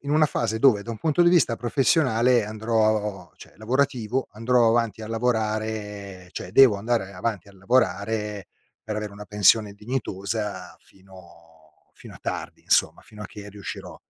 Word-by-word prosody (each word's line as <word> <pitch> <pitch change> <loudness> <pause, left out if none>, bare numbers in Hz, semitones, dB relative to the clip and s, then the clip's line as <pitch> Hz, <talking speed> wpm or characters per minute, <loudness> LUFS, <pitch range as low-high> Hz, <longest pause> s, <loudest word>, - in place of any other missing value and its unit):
in 140 - -6
una 155 +1 +4
fase 110 -5 -2
dove, 110 -5 +4
da 115 - -7
un 115 - -6
punto 155 +7 +2
di 175 - +5
vista 170 -9 +3
professionale 125 -2 +2
andrò 110 -3 -1
cioè, - - -15
lavorativo, 125 +1 -1
andrò 120 +2 +2
avanti 115 -1 0
a 110 - -6
lavorare 110 -4 -3
cioè, - - -7
devo 130 -4 +7
andare 100 -1 -2
avanti 105 -4 -3
a - - -16
lavorare 105 -1 -1 0.4
per 110 -1 -5
avere 105 -1 -4
una 105 +1 -10
pensione 105 0 +3
dignitosa 105 -4 -4
fino 85 -5 -20
fino - - -13
a - - -13
tardi, - - -5
insomma, - - +2
fino 105 -1 -12
a - - -6
che 105 -1 -11
riuscirò. 100 -2 -8
110 Hz, 160 wpm, -24 LUFS, 100-120 Hz, 0.4 s, devo